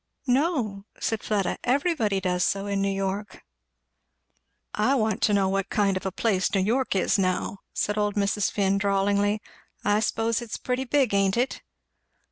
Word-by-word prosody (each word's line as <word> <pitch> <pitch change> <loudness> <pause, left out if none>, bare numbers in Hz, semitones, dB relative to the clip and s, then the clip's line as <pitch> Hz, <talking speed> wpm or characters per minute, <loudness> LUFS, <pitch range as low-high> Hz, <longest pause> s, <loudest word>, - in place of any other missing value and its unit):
"No," 250 - 0
said 225 -2 -1
Fleda; 200 -4 -1
"everybody 250 - +1
does 180 -1 0
so 195 0 0
in 200 -1 -1
New 200 - +1
York." 195 +1 -3 1.3
"I 245 +6 +2
want 220 -5 0
to 210 - +3
know 195 -1 +2
what 195 0 -1
kind 200 -2 +1
of 185 +1 -3
a - - -2
place 195 -1 0
New 195 - +3
York 230 +4 0
is, 190 +2 +2
now," 185 +1 -1
said 210 0 -1
old 205 -1 0
Mrs. 200 0 +1
Finn 200 -1 +1
drawlingly. 200 +1 +1 0.4
"I 205 +1 +3
s'pose 225 +1 0
it's 235 -2 -5
pretty 255 +1 -2
big, 265 -4 +2
ain't 195 +1 +2
it?" 250 +2 -1
205 Hz, 165 wpm, -26 LUFS, 195-225 Hz, 1.3 s, to